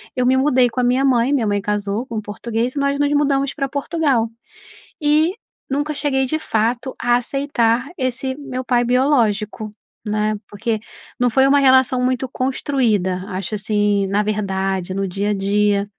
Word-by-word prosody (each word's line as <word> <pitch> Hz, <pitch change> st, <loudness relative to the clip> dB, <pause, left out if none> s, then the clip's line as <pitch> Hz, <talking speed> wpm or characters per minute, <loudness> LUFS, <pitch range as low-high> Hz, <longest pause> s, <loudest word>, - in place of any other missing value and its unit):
eu 250 Hz, -, +1 dB
me 260 Hz, +1 st, +4 dB
mudei 260 Hz, -3 st, +3 dB
com 250 Hz, -, -5 dB
a -, -, +2 dB
minha 250 Hz, +2 st, +2 dB
mãe 255 Hz, 0 st, +3 dB
minha 245 Hz, -6 st, +1 dB
mãe 205 Hz, 0 st, +1 dB
casou 210 Hz, +3 st, -2 dB
com 225 Hz, -4 st, -4 dB
português, 230 Hz, +4 st, -3 dB
nós 280 Hz, 0 st, 0 dB
nos 290 Hz, 0 st, +2 dB
mudamos 280 Hz, -2 st, +1 dB
pra 275 Hz, -2 st, -2 dB
Portugal 280 Hz, -5 st, 0 dB, 0.7 s
e 305 Hz, +3 st, +3 dB, 0.4 s
nunca 290 Hz, +3 st, -1 dB
cheguei 270 Hz, -2 st, 0 dB
de 310 Hz, +5 st, -1 dB
fato, 235 Hz, 0 st, -1 dB
a 240 Hz, 0 st, +2 dB
aceitar 245 Hz, -1 st, 0 dB
esse 260 Hz, 0 st, -2 dB
meu 255 Hz, -1 st, -4 dB
pai 245 Hz, -1 st, +2 dB
biológico, 230 Hz, -5 st, +1 dB, 0.3 s
né. 215 Hz, 0 st, 0 dB
Porque 215 Hz, +1 st, -2 dB, 0.4 s
não 245 Hz, -1 st, +2 dB
foi 265 Hz, +4 st, +4 dB
uma 285 Hz, +1 st, +4 dB
relação 260 Hz, -2 st, +4 dB
muito 255 Hz, +1 st, 0 dB
construída, 235 Hz, -9 st, 0 dB
acho 190 Hz, +3 st, -4 dB
assim 205 Hz, -1 st, +1 dB
na 200 Hz, +2 st, +1 dB
verdade, 195 Hz, -3 st, -2 dB
no 195 Hz, 0 st, -1 dB
dia 200 Hz, +3 st, -2 dB
a -, -, +1 dB
dia. 200 Hz, +1 st, +1 dB
245 Hz, 165 wpm, -20 LUFS, 210-270 Hz, 0.7 s, me